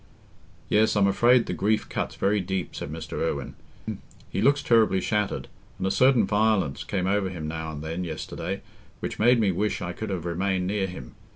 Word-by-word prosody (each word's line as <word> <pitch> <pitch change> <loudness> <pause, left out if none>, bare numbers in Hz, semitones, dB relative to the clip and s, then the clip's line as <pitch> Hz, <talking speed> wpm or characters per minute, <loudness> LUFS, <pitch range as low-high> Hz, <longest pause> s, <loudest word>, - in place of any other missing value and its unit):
"Yes, 110 +1 +3
I'm 100 -1 +4
afraid 120 +5 +4
the - - -3
grief 110 +2 +1
cuts - - -3
very 100 +2 +1
deep," 95 -1 -3
said 70 - -5
Mr. 80 0 -5
Irwine. 80 -3 -2 0.8
"He - - -1
looks 140 +4 +3
terribly 110 -7 +4
shattered, 105 +1 -1 0.3
and - - -3
a 95 - +1
certain 130 -3 +4
violence 105 -9 +1
came 95 -3 -2
over 95 0 +1
him 85 -4 -5
now 80 0 -4
and 75 -1 -7
then 80 +3 -3
yesterday, 80 -3 -5 0.4
which - - -5
made 120 +2 +5
me 105 -3 +3
wish 105 +4 -1
I 90 -1 -4
could 110 +3 -5
have 90 -4 -3
remained 90 +2 0
near 95 0 0
him. 90 -9 -9
95 Hz, 190 wpm, -26 LUFS, 85-110 Hz, 0.8 s, made